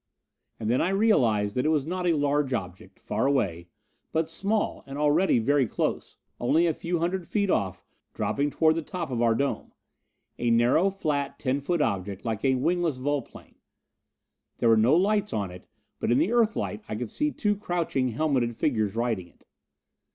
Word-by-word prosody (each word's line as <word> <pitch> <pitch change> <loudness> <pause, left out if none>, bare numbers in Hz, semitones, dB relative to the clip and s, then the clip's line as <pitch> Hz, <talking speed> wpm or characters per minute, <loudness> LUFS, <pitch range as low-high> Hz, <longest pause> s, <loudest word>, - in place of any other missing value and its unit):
And 110 - -4
then 120 +3 +2
I 175 - +1
realized 120 - +2
that 125 - 0
it - - +3
was 150 -4 +1
not 180 +2 -2
a 170 - +4
large 145 -2 +1
object, 95 -4 -7
far - - -1
away, 95 -12 0 0.4
but 160 0 0
small, 200 +6 -1
and 135 +1 -7
already 150 +3 +3
very 135 +2 +2
close - - -3 0.2
only 160 +8 +3
a 165 - +2
few 170 +3 -2
hundred 175 +1 -2
feet 200 -3 0
off, 95 -3 -1 0.3
dropping 145 +1 0
toward 155 +2 +3
the 165 - -2
top 170 -2 -5
of 120 -2 -1
our 115 -1 +3
dome. 140 +3 -2 0.7
A 120 - +1
narrow, 120 +11 +4
flat, 150 -7 -2
ten 135 0 -1
foot 165 +2 0
object, 100 -1 -3
like 110 -2 -2
a 135 -1 +3
wingless 165 +2 0
volplane. 140 0 -4 1.0
There 115 - +2
were 115 - +6
no 115 +7 +4
lights 205 +3 +1
on 100 -4 -2
it, 90 0 -12 0.3
but - - 0
in 120 - +4
the 165 +9 +2
Earthlight 220 - +1
I - - -3
could 115 0 -5
see 300 - 0
two 210 -7 0
crouching, 175 -9 -1
helmeted 125 -2 0
figures 110 -7 0
riding 115 -6 -1
it. - - -27
140 Hz, 180 wpm, -26 LUFS, 115-170 Hz, 1.0 s, were